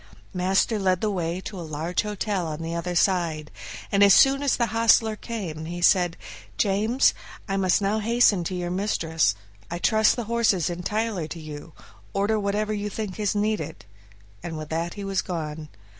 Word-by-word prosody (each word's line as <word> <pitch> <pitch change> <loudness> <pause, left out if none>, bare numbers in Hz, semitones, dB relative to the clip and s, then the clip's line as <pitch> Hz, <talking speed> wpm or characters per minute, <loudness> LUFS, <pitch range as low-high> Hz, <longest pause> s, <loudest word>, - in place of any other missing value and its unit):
Master 190 +4 +1
led 185 -2 +2
the 215 +1 0
way 175 -2 -2
to 190 -1 -7
a - - -5
large 160 +2 -2
hotel 205 -3 -2
on 155 +1 -5
the 165 +1 -4
other 175 +1 -3
side, 170 -5 +1 0.4
and 200 - +2
as 200 -1 +8
soon 275 0 +5
as 285 -2 +2
the 235 - +2
hostler 225 -1 +4
came, 185 -10 -6
he 175 +2 -5
said, 175 -1 +3 0.4
"James, 215 +6 +2 0.3
I 195 - -1
must 190 +1 +2
now 205 +2 +1
hasten 220 -4 +3
to 185 - -3
your 175 -1 -3
mistress; 165 - 0 0.3
I 170 - -3
trust 220 +4 +3
the 240 - -3
horses 220 -6 +1
entirely 200 0 -2
to 165 - -7
you, 155 0 -9 0.4
order 205 +2 +1
whatever 210 +1 -1
you 210 0 -3
think 210 -1 -5
is 210 -1 0
needed," 205 - -2 0.6
and 165 +3 -5
with 155 -1 -7
that 165 +2 -2
he 205 - -6
was 195 -2 0
gone. 155 -3 -5
190 Hz, 180 wpm, -25 LUFS, 170-215 Hz, 0.6 s, as